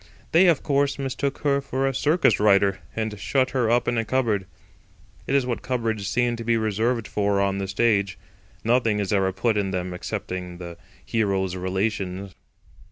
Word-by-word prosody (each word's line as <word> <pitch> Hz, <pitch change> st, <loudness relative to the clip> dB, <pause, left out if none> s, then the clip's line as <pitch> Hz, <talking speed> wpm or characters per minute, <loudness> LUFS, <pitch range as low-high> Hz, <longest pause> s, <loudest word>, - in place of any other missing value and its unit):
They, 180 Hz, +3 st, +6 dB
of 165 Hz, -5 st, +3 dB
course, 140 Hz, -1 st, +1 dB
mistook 135 Hz, 0 st, -3 dB
her 140 Hz, -1 st, +2 dB
for 135 Hz, -1 st, -2 dB
a 135 Hz, -, +1 dB
circus 150 Hz, +6 st, +2 dB
rider, 100 Hz, -2 st, +4 dB, 0.2 s
and 110 Hz, -2 st, -3 dB
shut 130 Hz, +4 st, +1 dB
her 125 Hz, -4 st, +1 dB
up 120 Hz, +1 st, +2 dB
in 120 Hz, -1 st, +1 dB
a -, -, 0 dB
cupboard. 110 Hz, -6 st, 0 dB, 0.8 s
It 135 Hz, -, +1 dB
is 135 Hz, -2 st, +3 dB
what 125 Hz, -2 st, -2 dB
cupboards 115 Hz, -5 st, -2 dB
seem 120 Hz, +4 st, +1 dB
to 115 Hz, -, -6 dB
be 115 Hz, 0 st, +2 dB
reserved 110 Hz, +2 st, 0 dB
for 100 Hz, -1 st, 0 dB
on 100 Hz, 0 st, +1 dB
the 95 Hz, -, -3 dB
stage. 100 Hz, -1 st, +1 dB, 0.5 s
Nothing 115 Hz, -2 st, +2 dB
is 100 Hz, -1 st, -1 dB
ever 95 Hz, -1 st, +2 dB
put 105 Hz, +4 st, 0 dB
in 100 Hz, -2 st, 0 dB
them 90 Hz, -1 st, -3 dB
excepting 90 Hz, 0 st, -5 dB
the 85 Hz, -1 st, -8 dB, 0.3 s
hero's 95 Hz, -4 st, 0 dB
relations. 95 Hz, 0 st, -2 dB
110 Hz, 175 wpm, -24 LUFS, 95-125 Hz, 0.8 s, They